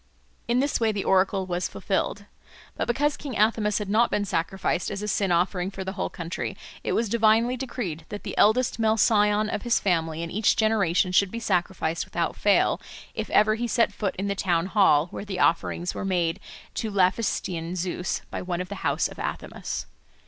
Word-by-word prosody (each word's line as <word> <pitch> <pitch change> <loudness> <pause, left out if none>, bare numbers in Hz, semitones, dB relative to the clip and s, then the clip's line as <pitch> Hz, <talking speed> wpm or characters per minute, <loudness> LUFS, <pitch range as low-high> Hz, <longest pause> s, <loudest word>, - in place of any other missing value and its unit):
In 240 +2 +2
this 285 +1 0
way 225 -2 +2
the 205 -2 -3
oracle 190 0 +2
was 180 0 -2
fulfilled. - - -2 0.5
But - - -2
because 290 +4 +1
King 275 -6 -6
Athamas 210 -1 +2
had 210 - -3
not 220 +4 +3
been 205 - 0
sacrificed 175 0 -1
as 205 0 -4
a - - -3
sin 195 -2 0
offering 180 +1 +1
for 195 -1 -6
the 190 - -4
whole - - -3
country, 170 -1 -5 0.3
it - - -1
was 230 - +1
divinely 225 +3 +3
decreed 235 - -5
that 205 - -6
the - - -5
eldest 230 +3 +3
male 220 0 +2
scion 210 -1 +3
of 210 - -3
his 240 -1 +2
family 165 -3 0
in 165 - -5
each 210 +2 +2
generation 200 -5 +2
should 190 +1 +4
be 230 - -5
sacrificed 180 -5 -1
without 170 -1 -2
fail, 205 -1 +2 0.3
if - - -4
ever 215 +1 +4
he 235 +2 -2
set 230 -2 +2
foot 200 -2 -2
in 195 +2 -3
the 200 - 0
town 175 -4 0
hall, 185 -7 +4
where - - -6
the 195 -3 -5
offerings 175 +1 +1
were - - -5
made 180 -2 0 0.3
to 220 - -2
Laphystian 185 -3 0
Zeus 180 0 -2
by - - -4
one 180 -1 -3
of 180 0 -4
the 200 -1 -7
house - - +1
of - - -12
Athamas. - - -4
200 Hz, 200 wpm, -26 LUFS, 180-220 Hz, 0.5 s, should